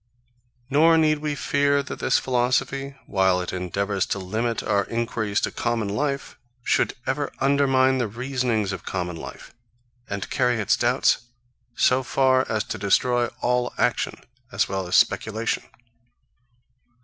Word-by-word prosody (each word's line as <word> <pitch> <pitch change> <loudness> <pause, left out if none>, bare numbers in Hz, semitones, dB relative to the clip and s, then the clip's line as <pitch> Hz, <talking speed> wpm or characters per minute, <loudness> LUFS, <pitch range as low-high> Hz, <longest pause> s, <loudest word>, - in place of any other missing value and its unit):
Nor 160 +4 +5
need 155 -1 +3
we 150 -1 -2
fear 140 -1 +1
that 140 - -7
this - - +2
philosophy, 130 +2 0
while 95 -2 +2
it 90 - -4
endeavours 95 +2 -1
to - - -1
limit 110 +5 -2
our 100 -1 +1
enquiries 115 -3 -1
to - - -1
common 115 -3 -1
life, 140 +6 -3 0.2
should - - +1
ever 145 0 -1
undermine 135 -1 +3
the 120 - 0
reasonings 120 -2 -1
of 95 - -6
common 90 -2 -3
life, 80 - -10 0.6
and 100 -1 -4
carry 125 0 +2
its 105 0 +2
doubts 120 -1 +1 0.5
so 130 +1 +3
far 130 0 +2
as 110 -1 0
to 110 - -6
destroy 120 +5 +2
all 125 0 0
action, 125 - 0 0.4
as 95 0 +1
well 95 -2 -3
as 90 - 0
speculation. 110 +1 +1
120 Hz, 140 wpm, -24 LUFS, 100-135 Hz, 0.6 s, Nor